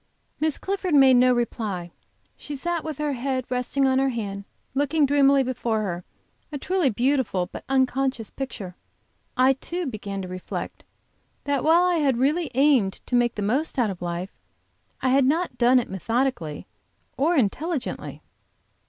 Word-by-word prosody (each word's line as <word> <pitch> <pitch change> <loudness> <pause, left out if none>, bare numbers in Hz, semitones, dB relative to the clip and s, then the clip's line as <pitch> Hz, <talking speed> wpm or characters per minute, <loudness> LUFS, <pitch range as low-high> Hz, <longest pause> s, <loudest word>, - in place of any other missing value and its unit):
Miss 310 -1 0
Clifford 380 -4 -1
made 270 -2 +7
no 250 +1 +5
reply. 215 -7 -2 0.4
She 295 - -7
sat 340 +3 -2
with 310 -3 -5
her 300 -1 -1
head 260 0 -2
resting 250 +2 0
on 260 0 +3
her 270 0 +2
band, 200 -5 -4 0.3
looking 290 +2 +2
dreamily 280 -1 +4
before 235 -3 -1
her, 175 -3 -4 0.5
a 290 - -3
truly 360 0 +1
beautiful, 240 -6 0
but - - -8
unconscious 260 -3 0
picture. 205 -9 -6 0.6
I 260 +1 +5
too, 345 +6 -5
began 200 -6 -5
to - - -6
reflect, 185 0 -6 0.6
that 285 -2 0
while 330 +3 +5
I 360 -1 +2
had 275 -6 +2
really 295 +5 +1
aimed 265 -8 +4
to - - -10
make 240 -1 +2
the 210 - -3
most 265 +11 -1
out 235 -5 +2
of 180 - -9
life, 175 +2 -4 0.7
I 260 - +3
had 265 +1 +4
not 325 +6 0
done 245 +1 +5
it 245 - -3
methodically 190 - -2 0.5
or 310 +7 +2
intelligently. 285 - -2
260 Hz, 160 wpm, -24 LUFS, 220-285 Hz, 0.7 s, made